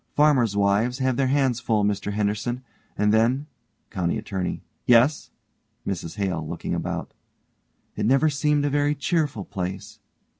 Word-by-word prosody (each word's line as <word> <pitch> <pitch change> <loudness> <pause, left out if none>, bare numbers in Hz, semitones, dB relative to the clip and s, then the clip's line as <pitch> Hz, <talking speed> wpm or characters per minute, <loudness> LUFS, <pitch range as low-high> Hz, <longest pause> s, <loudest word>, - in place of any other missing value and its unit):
Farmers' 130 -9 +3
wives 100 +5 +2
have 130 -2 +1
their 135 +1 +1
hands 130 -3 +2
full, 110 -3 +1
Mr 100 0 -1
Henderson. 105 +4 -1 0.3
And 105 0 +3
then 120 +6 +2 0.5
COUNTY 90 -5 -1
ATTORNEY: 95 -2 -4 0.2
Yes? 125 +5 +4 0.6
MRS 85 -3 -4
HALE: 90 -6 -2
(looking - - -4
about) - - -3 0.8
It - - -1
never 135 +5 +4
seemed 150 0 +1
a - - +2
very 145 +1 +2
cheerful 145 - -1
place. 95 -1 -5
115 Hz, 140 wpm, -24 LUFS, 100-140 Hz, 0.8 s, Yes